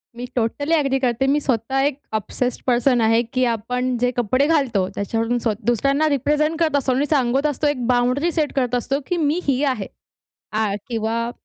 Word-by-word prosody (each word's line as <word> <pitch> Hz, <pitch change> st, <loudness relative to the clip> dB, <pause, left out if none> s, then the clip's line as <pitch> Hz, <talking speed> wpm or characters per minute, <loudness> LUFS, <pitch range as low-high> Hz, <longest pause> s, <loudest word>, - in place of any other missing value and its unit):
मी 245 Hz, +1 st, -5 dB
totally 260 Hz, +6 st, -1 dB
agree 275 Hz, -3 st, +1 dB
करते. 255 Hz, 0 st, 0 dB
मी 285 Hz, +2 st, +3 dB
स्वतः 260 Hz, 0 st, -1 dB
एक 285 Hz, -1 st, -1 dB, 0.2 s
ऑब्सेस्ड 245 Hz, +4 st, -2 dB
पर्सन 245 Hz, 0 st, +3 dB
आहे, 225 Hz, +1 st, +4 dB
की 255 Hz, +2 st, -2 dB
आपण 250 Hz, +3 st, -2 dB
जे 245 Hz, +1 st, +1 dB
कपडे 255 Hz, +4 st, +2 dB
घालतो, 265 Hz, -, +1 dB
त्याच्यावरून 225 Hz, +4 st, -1 dB
स्व 225 Hz, -, +2 dB
दुसऱ्यांना 275 Hz, +6 st, +2 dB
रिप्रेझेंट 300 Hz, +3 st, +1 dB
करत 320 Hz, -3 st, +2 dB
असतो 270 Hz, -2 st, +1 dB
आणि 270 Hz, +3 st, +1 dB
सांगत 270 Hz, -1 st, +1 dB
असतो, 295 Hz, +1 st, -1 dB
एक 265 Hz, -4 st, -1 dB
बाउंड्री 250 Hz, +6 st, +2 dB
सेट 310 Hz, -3 st, -1 dB
करत 250 Hz, -3 st, 0 dB
असतो, 270 Hz, +3 st, -1 dB
की 355 Hz, -, -1 dB
"मी 310 Hz, +1 st, +1 dB
ही 275 Hz, 0 st, +1 dB
आहे." 210 Hz, -6 st, -6 dB, 0.7 s
आ, 215 Hz, -1 st, 0 dB
किंवा 230 Hz, 0 st, -2 dB
255 Hz, 185 wpm, -21 LUFS, 235-285 Hz, 0.7 s, आहे